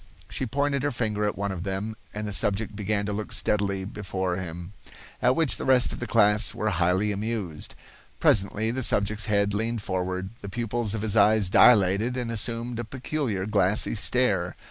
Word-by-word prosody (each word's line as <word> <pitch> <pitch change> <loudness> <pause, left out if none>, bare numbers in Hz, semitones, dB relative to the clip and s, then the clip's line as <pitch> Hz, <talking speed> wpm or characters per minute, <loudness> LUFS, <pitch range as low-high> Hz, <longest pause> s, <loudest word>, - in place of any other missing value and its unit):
She 130 - -2
pointed 140 +3 0
her 145 - 0
finger 110 -5 -1
at 105 - -2
one 100 0 -2
of 90 -3 -5
them, 100 +4 -4 0.2
and 105 0 -5
the - - -4
subject 105 +1 0
began 105 0 -1
to 105 - -3
look 105 +1 -5
steadily 100 -2 0
before 95 -3 -3
him, 90 +1 -7 0.5
at 125 +1 +3
which 160 -5 +1
the - - -5
rest 130 -2 +3
of - - -7
the 120 - -4
class 105 -1 +3
were 110 - -1
highly 90 +4 +1
amused. 100 -6 -4 0.4
Presently 105 +2 +2
the 130 +2 -3
subject's 105 -2 +1
head 100 -2 +1
leaned 110 +1 -2
forward, 95 0 -3
the 100 - -8
pupils 115 0 -2
of 110 - -4
his 110 -1 +2
eyes 105 -2 +4
dilated 110 +2 +4
and 120 -2 -3
assumed 115 +1 -2
a - - -2
peculiar 125 -4 -3
glassy 100 -1 +2
stare. 105 -6 +1
105 Hz, 185 wpm, -26 LUFS, 95-115 Hz, 0.5 s, eyes